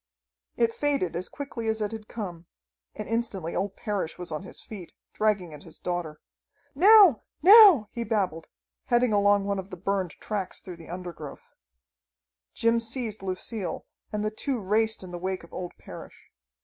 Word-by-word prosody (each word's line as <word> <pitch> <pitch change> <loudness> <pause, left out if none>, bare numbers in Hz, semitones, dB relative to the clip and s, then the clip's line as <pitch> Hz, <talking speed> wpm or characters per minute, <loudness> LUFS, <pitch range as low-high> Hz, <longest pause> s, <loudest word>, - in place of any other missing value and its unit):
It 230 -1 +2
faded 280 - 0
as 180 +2 -3
quickly 260 -5 -6
as 220 0 0
it 210 -1 -2
had 220 -1 -7
come, 175 -8 -7 0.5
and - - -6
instantly 215 -7 -2
old 195 +1 -2
Parrish 205 -7 -3
was 180 -2 -7
on 155 - -3
his 190 - -9
feet, 195 -6 -9 0.2
dragging 200 -6 0
at 150 - -10
his 165 - -12
daughter. 175 -4 -4 0.5
"Now! 380 - +7 0.2
Now!" 385 - +9
he 235 - -3
babbled, 195 -8 -1 0.4
heading 240 -2 +2
along 205 -1 +4
one 200 -1 -1
of 190 +1 -7
the 185 - -8
burned 190 -1 -1
tracks 200 -4 -4
through 180 -2 -9
the 165 - -13
undergrowth. 175 -5 -8 1.0
Jim 230 0 +3
seized 225 -2 -3
Lucille 190 0 -4 0.3
and 210 0 -2
the 215 - 0
two 255 +3 -2
raced 220 +2 +1
in 185 - -9
the 175 - -6
wake 185 0 -3
of 170 - -16
old 180 -1 -5
Parrish. - - -12
205 Hz, 170 wpm, -27 LUFS, 180-230 Hz, 1.0 s, Now